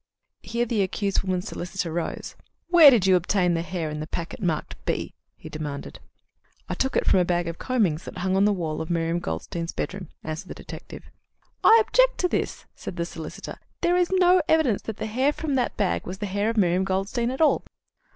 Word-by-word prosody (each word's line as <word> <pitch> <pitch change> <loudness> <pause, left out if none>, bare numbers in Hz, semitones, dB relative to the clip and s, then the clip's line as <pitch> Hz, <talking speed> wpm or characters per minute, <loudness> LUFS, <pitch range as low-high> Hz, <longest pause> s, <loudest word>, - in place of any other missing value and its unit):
Here 235 +1 -1
the 225 -3 0
accused 195 +1 0
woman's 185 -1 -2
solicitor 175 -2 -4
rose. 170 0 -4 0.3
"Where 340 -4 +9
did 235 -8 +4
you 190 -1 +5
obtain 180 0 +2
the 165 - 0
hair 170 -3 -3
in 150 - -4
the 155 - -5
packet 170 +5 -5
marked 170 -5 -1
B?" - - -2 0.2
he - - -11
demanded. 150 -2 -6 0.7
"I - - -2
took 265 0 -1
it - - +2
from 190 - +4
a - - +4
bag 175 -1 0
of 170 0 -5
combings 200 -11 0
that - - -8
hung 185 +1 0
on 195 +1 +4
the 210 - +4
wall 165 -6 -2
of 160 - -5
Miriam 165 0 0
Goldstein's 165 - -4
bedroom," 185 -3 -4
answered 155 0 -5
the - - -7
detective. - - -10 0.6
"I 450 - +8
object - - +3
to 360 - +2
this," - - -2
said - - -7
the 170 -1 -2
solicitor. 160 -2 -8 0.2
"There 350 +1 +3
is 360 -1 +2
no 365 -1 +5
evidence 310 -10 +3
that 220 -2 -6
the - - -3
hair 255 +6 +1
from 300 -1 -3
that 255 -2 0
bag 200 -3 0
was 185 - -5
the 210 - -4
hair 205 +2 0
of 230 - -3
Miriam 180 -2 +3
Goldstein 195 +5 -1
at 260 - -4
all." 315 - +4
190 Hz, 210 wpm, -25 LUFS, 170-240 Hz, 0.7 s, Where